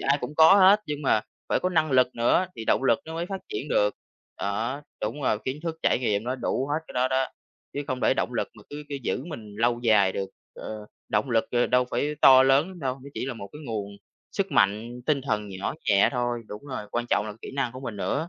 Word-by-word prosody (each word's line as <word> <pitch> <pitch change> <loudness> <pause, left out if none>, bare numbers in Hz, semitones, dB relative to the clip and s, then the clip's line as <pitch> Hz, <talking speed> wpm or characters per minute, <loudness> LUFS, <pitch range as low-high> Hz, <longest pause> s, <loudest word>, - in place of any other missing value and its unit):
ai 140 +1 +2
cũng 135 +5 -5
có 160 +4 +8
hết, 200 +1 +7
nhưng 150 0 -4
mà 110 -6 +3 0.3
phải - - +1
có 185 - +1
năng 160 -4 +1
lực 130 -1 +3
nữa 120 +10 +2
thì 110 - -6
động - - +2
lực 115 -3 +4
nó 160 0 -7
mới 170 +1 -3
phát 195 0 -5
triển 150 - -4
được. 105 -5 +2 0.4
Đó, 115 +8 -2 0.2
đúng 115 +7 -3
rồi 110 -5 +1
kiến 135 +3 -3
thức, 165 -1 -3
trải - - +3
nghiệm, 105 -4 0
nó 125 +2 -1
đủ 130 0 -1
hết 155 - +2
cái - - -9
đó 125 +1 +1
đó, 130 0 +1 0.5
chứ 145 - -3
không 130 -1 -3
để - - +3
động - - -1
lực - - -1
mà - - -15
cứ 145 +1 -6
cứ 145 - -5
giữ 130 +3 -2
mình 110 -11 -9
lâu 120 +1 +1
dài 110 -5 +4
được, 95 0 -4 0.2
ờ, 110 -1 -7 0.2
động 105 +5 0
lực, 115 -2 +3
ờ, 120 0 +2
đâu 125 0 +3
phải 150 +1 -1
to 130 -1 +9
lớn 135 +5 +4
lắm 185 -1 -10
đâu, 130 -3 -1
nó - - -8
chỉ - - -3
là 135 - -3
một 100 -3 -8
cái 150 - -10
nguồn 100 -3 -4 0.4
sức - - -2
mạnh 110 +5 +1
tinh 150 -3 +2
thần 105 -5 -2
nhỏ 95 0 -4
nhẹ 100 -1 +5
thôi, 120 -2 -1
đúng 105 +5 -8
rồi, 130 -6 -4
quan 120 0 -2
trọng 105 - +2
là 105 - -5
kỹ - - -7
năng 135 -4 -1
của 130 - -8
mình 120 -5 -6
nữa. 145 - -2
125 Hz, 255 wpm, -26 LUFS, 110-145 Hz, 0.5 s, to